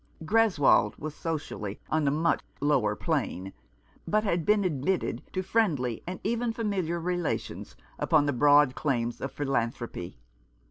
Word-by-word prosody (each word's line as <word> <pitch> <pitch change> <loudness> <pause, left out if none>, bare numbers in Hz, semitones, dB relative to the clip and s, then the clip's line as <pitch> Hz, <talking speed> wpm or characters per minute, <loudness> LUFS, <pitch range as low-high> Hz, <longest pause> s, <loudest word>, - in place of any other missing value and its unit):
Greswold 170 - +3
was 155 0 -5
socially 145 -12 -4
on 155 -2 +2
a - - +5
much 160 +4 +1 0.2
lower 135 -8 +2
plane, 95 -1 -2 0.5
but 215 0 +2
had 175 -6 0
been 210 -1 +4
admitted 175 +1 -1
to 185 - -2
friendly 155 - 0
and 180 +1 -4
even 235 +2 0
familiar 190 -7 -1
relations 175 -1 -3 0.2
upon 155 -3 +3
the 145 - +1
broad 145 +1 +5
claims 120 -5 -1
of 135 - -3
philan 135 -5 0
thropy. 95 -7 -7
155 Hz, 140 wpm, -28 LUFS, 130-185 Hz, 0.5 s, a